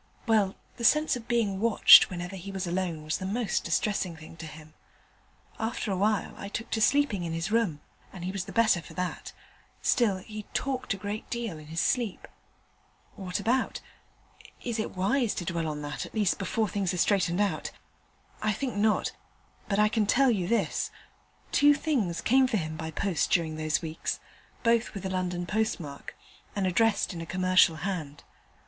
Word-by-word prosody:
Well, 215 -4 +2 0.2
the 235 - -6
sense 300 +4 +4
of 235 -2 -8
being 215 -5 +1
watched 230 +1 +8
whenever 180 +1 -5
he 190 +1 -7
was 190 -1 -3
alone 175 -3 -2
was 155 0 -2
the 185 - -4
most 215 0 -1
distressing 180 +1 0
thing 160 0 -12
to 160 - -7
him. 155 0 -12 0.9
After 220 -1 -2
a - - +1
time 210 +2 +1
I 200 - -6
took 230 +3 -5
to 220 - 0
sleeping 250 -6 +3
in 165 -1 -3
his 165 +4 -2
room, 210 -10 +1 0.3
and 180 -2 -7
he 185 - -2
was 190 -2 -3
the - - -8
better 220 -6 +3
for - - -13
that: 180 -1 -4 0.5
still, 215 -6 +3
he 210 +2 -8
talked 255 -5 -1
a - - -9
great 205 +2 -5
deal 230 -9 -4
in 150 - -12
his 165 +1 -2
sleep. 235 -3 0 0.9
What 185 -1 -3
about? 240 +6 0 0.8
Is 235 -2 -2
it 220 - -3
wise 235 +5 +1
to 175 - -4
dwell 165 -1 -2
on 150 -1 -4
that, 145 0 -4
at - - -16
least 210 -3 +1
before 210 +3 0
things 195 -2 -1
are - - -4
straightened 185 -1 +2
out? 205 -1 0 0.7
I 215 0 +1
think 245 +2 -3
not, 215 +1 +2 0.6
but 200 - +1
I 210 0 +5
can 215 -1 0
tell 270 +3 +4
you 185 -6 0
this: 230 +4 0 0.6
two 290 0 +5
things 235 - -1
came 260 +2 +4
for 240 -4 0
him 155 -3 -3
by 160 0 -5
post 170 +2 0
during 165 -3 +1
those 155 +2 -1
weeks, 160 0 -3 0.4
both 230 -1 +2
with 195 - -6
a - - -1
London 180 -1 -2
postmark, 175 -8 -3 0.4
and 200 -2 0
addressed 205 +3 +2
in 170 - -6
a - - -5
commercial 185 -2 +4
hand. 155 -7 -4
195 Hz, 185 wpm, -28 LUFS, 175-225 Hz, 0.9 s, watched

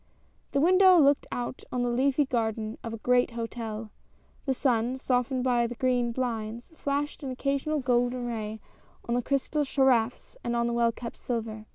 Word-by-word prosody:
The 280 - +1
window 370 +3 +6
looked 285 -3 +4
out 245 +1 -4
on 250 -1 0
the 245 - +1
leafy 270 +4 +2
garden 220 -3 -2
of 230 - -4
a 225 - -5
great 250 0 +4
hotel. 230 -2 -5 0.6
The 265 - +3
sun, 245 -1 +1
softened 255 0 0
by 240 -2 +2
the 240 - -6
green 245 -1 +1
blinds, 235 +1 -4
fiashed 285 0 -2
an 275 - -4
occasional 280 +3 -1
golden 245 -1 +1
ray 220 -2 -4 0.5
on 235 - 0
the 245 - +2
crystal 280 +3 0
carafes 260 -4 +1
and 240 0 -1
on 235 0 +1
the 235 - 0
well 235 0 +3
kept 235 0 -8
silver. 220 -3 -4
245 Hz, 175 wpm, -28 LUFS, 230-270 Hz, 0.6 s, window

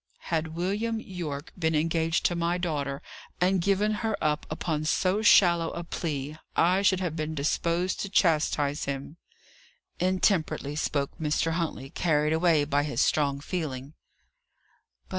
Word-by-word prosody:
"Had 160 0 -1
William 210 +6 -1
Yorke 165 -8 -6
been 160 -2 +1
engaged 165 +1 +1
to 175 - +2
my 170 +1 0
daughter, 145 -6 -3 0.4
and 185 0 +2
given 200 +3 +2
her 220 -2 -1
up 150 0 -1
upon 155 -1 -2
so 185 +5 +1
shallow 170 -6 +5
a 170 - -5
plea, 155 -3 -4 0.2
I 180 +3 +3
should 195 -2 +3
have 175 -4 -2
been 155 0 -3
disposed 170 +5 0
to 200 - -3
chastise 150 -5 +1
him," 140 +3 -5 0.8
intemperately 180 -5 +1
spoke 140 -2 -1
Mr. 155 +1 0
Huntley, 160 -5 -3
carried 150 -2 +1
away 160 -2 +3
by 145 0 +1
his 145 0 -3
strong 140 -2 +2
feeling. 145 -5 -4
160 Hz, 140 wpm, -27 LUFS, 150-180 Hz, 0.8 s, shallow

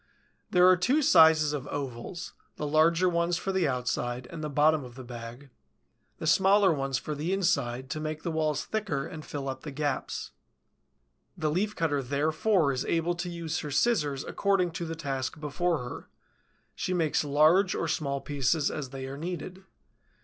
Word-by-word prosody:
There 180 0 +5
are 185 - +7
two 255 - +2
sizes 160 - +6
of 145 -2 -4
ovals, 140 +5 -5 0.2
the 150 - -4
larger 165 +4 +3
ones 170 0 +1
for 195 - -2
the 190 -4 +1
outside 125 -1 -2
and 165 - -6
bottom 150 0 +4
of 125 -2 -11
the 130 - -9
bag; 120 +2 -9 0.7
the 165 - -6
smaller 190 +2 +5
ones 135 -2 -1
for 150 - -4
the 150 +5 -3
inside, 140 -10 0
to 155 - -2
make 155 0 -4
the 170 - -2
walls 155 -2 0
thicker 200 -11 -2
and 155 -1 -8
fill 140 -2 -5
up 130 -1 -4
the 155 - -7
gaps. 145 -1 -3 1.1
The 155 -3 0
Leaf 205 +6 -1
cutter 145 -4 0
therefore 155 - +1
is 130 -1 -2
able 170 +1 +1
to 175 +1 -4
use 165 -2 -3
her 150 - -5
scissors 145 - +1
according 195 -3 +1
to 170 +1 -4
the 165 - -4
task 135 -2 -3
before 155 +1 -1
her; - - -9 0.6
she 185 - -2
makes 160 -4 +1
large 155 +7 +4
or 165 - -1
small 140 -3 -1
pieces 145 +2 0
as 145 -4 -5
they 135 0 -6
are 135 +1 -6
needed. 180 +3 -6
155 Hz, 175 wpm, -28 LUFS, 140-175 Hz, 1.1 s, are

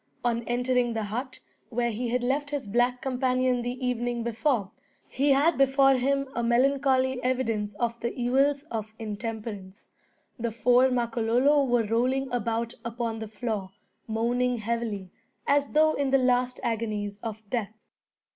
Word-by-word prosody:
On 235 -1 +1
entering 245 0 +1
the 220 -1 -2
hut 245 +6 -5 0.3
where 235 0 0
he 235 +2 -3
had 245 +1 0
left 285 +3 0
his 285 -2 -3
black 245 +4 +1
companion 255 -1 +1
the 245 +1 -3
evening 240 -1 -1
before, 235 -3 0 0.4
he 280 +3 0
had 280 +3 +4
before 270 0 +5
him 275 +2 +1
a 235 - -1
melancholy 260 +1 +2
evidence 225 -5 -1
of 235 +2 -2
the 235 - -2
evils 275 +3 +2
of 220 -1 -4
intemperance. 215 -2 -6 0.5
The 235 0 -1
four 245 +3 +4
Makololo 245 +4 +2
were 245 -2 +2
rolling 250 +4 0
about 230 0 -1
upon 230 -1 -3
the 220 - -5
floor, 215 -3 -4 0.4
moaning 240 +2 0
heavily, 220 -4 -3 0.3
as 285 0 +2
though 310 +1 +5
in 280 -1 0
the 270 - +5
last 250 -1 +1
agonies 215 -3 -2
of 220 -2 -6
death. 220 -3 -2
240 Hz, 145 wpm, -27 LUFS, 225-260 Hz, 0.5 s, before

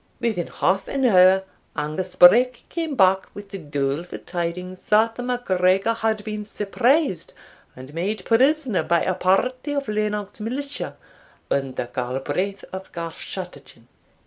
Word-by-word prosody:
Within 220 -8 -1
half 190 +1 0
an 270 -1 0
hour 190 -3 +6 0.3
Angus 155 +5 -3
Breck 240 +7 +6
came 325 -4 -3
back 190 -3 +4
with 205 -1 -9
the 195 - -6
doleful 145 +2 -3
tidings 180 +1 -5
that 220 +2 +4
the 245 - -6
MacGregor 195 -4 +1
had 220 -2 -1
been 210 -1 -4
surprised 230 - 0 0.4
and 130 +3 -11
made 185 +4 -3
prisoner 260 -1 +3
by 170 -1 +1
a 185 - +1
party 250 +10 +1
of 280 -2 -2
Lennox 210 -1 -2
militia, 275 +6 -4 0.5
under 135 -3 -1
Galbraith 145 +10 -2
of 190 0 -7
Garschattachin." 165 -6 -8
195 Hz, 130 wpm, -23 LUFS, 175-230 Hz, 0.5 s, hour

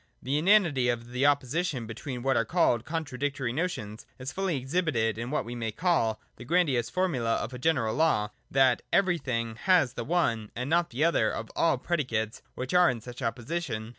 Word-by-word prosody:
The 140 +3 -1
inanity 170 -9 +4
of 120 0 -3
the 130 +3 +2
opposition 145 -1 0
between 120 +3 -6
what 135 0 +2
are 115 - +3
called 120 -3 +2
contradictory 145 -5 -3
notions 120 - -4
is 130 +1 -5
fully 190 -5 -1
exhibited 130 - 0
in 120 +1 -4
what 150 - -1
we 120 - -6
may 115 -2 -3
call 130 - +1 0.2
the - - -9
grandiose 140 -6 +1
formula 130 -12 0
of - - -4
a 125 - -6
general 130 -7 +1
law, 105 -10 +2 0.2
that 130 -2 +3
Everything 130 - 0
has 175 -8 +3
the 120 - -4
one 120 -8 0
and 125 +5 -3
not 170 +1 +3
the 130 +6 -1
other 170 +1 +3
of - - -5
all 165 - +3
predi 170 -6 -1
cates 110 0 -2
which 130 +4 -4
are 180 -1 +6
in 125 - -2
such 120 +3 -10
opposition. 120 -1 -3
130 Hz, 190 wpm, -28 LUFS, 115-165 Hz, 0.2 s, are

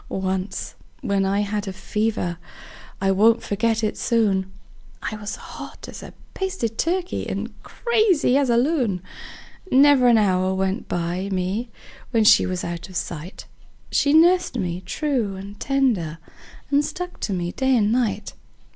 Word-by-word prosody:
Once 190 0 -3 0.3
when 195 -1 +1
I 200 +1 +1
had 205 0 -2
a 190 - -4
fever 200 -3 -2 0.6
I 195 0 +2
won't 225 +4 +4
forget 225 +2 0
it 215 - 0
soon 200 -5 +1 0.5
I 215 - -3
was 210 -1 -5
hot - - -10
as - - -9
a - - -9 0.2
basted 375 - -3
turkey 360 +2 -1
and - - -4
crazy 430 - +2
as 275 -2 +3
a 235 - +4
loon; 240 - +1 0.7
Never 275 -1 +6
an 235 -2 +6
hour 190 -2 +2
went 190 +4 -1
by 175 +3 -2
me 190 +6 -2 0.4
when 225 -3 +2
she 210 -1 +6
was 185 -1 -3
out 170 +1 -5
of 185 - -12
sight 170 +1 -5 0.5
She 285 - +3
nursed 340 -2 +4
me 180 -4 -2
true 255 -10 -1
and 200 +2 -9
tender, 235 - 0 0.5
and 285 +1 +4
stuck 360 +4 -5
to - - -3
me 175 -1 -2
day 265 +2 +2
and 210 -1 +2
night. 215 -4 0
210 Hz, 155 wpm, -23 LUFS, 190-260 Hz, 0.7 s, Never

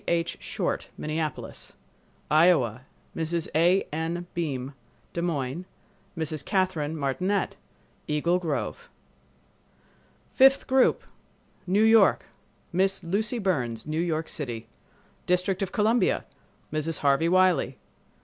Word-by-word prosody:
H. 170 -1 0
Short, - - -3
Minneapolis. 155 -1 -4 0.6
Iowa—Mrs. 160 +2 +1
A. 175 +5 +4
N. 165 +2 -2
Beim, 140 -5 -3 0.4
Des 170 - -2
Moines; 160 -1 -2 0.5
Mrs. 155 -2 -3
Catherine 170 -5 0
Martinette, 180 +8 -1 0.5
Eagle 170 +4 +1
Grove. 145 -10 -3 1.4
Fifth 270 +1 +5
Group 265 -1 +3 0.6
New 200 +4 +3
York—Miss 195 -3 +2
Lucy 210 +7 0
Burns, 130 - -1
New 155 +2 -1
York 160 -2 -1
City. 120 -6 -5 0.6
District 180 +2 +1
of 195 - -2
Columbia—Mrs. 210 -8 -1
Harvey 145 +4 +3
Wiley. 185 -7 +3
165 Hz, 90 wpm, -26 LUFS, 150-185 Hz, 1.4 s, Fifth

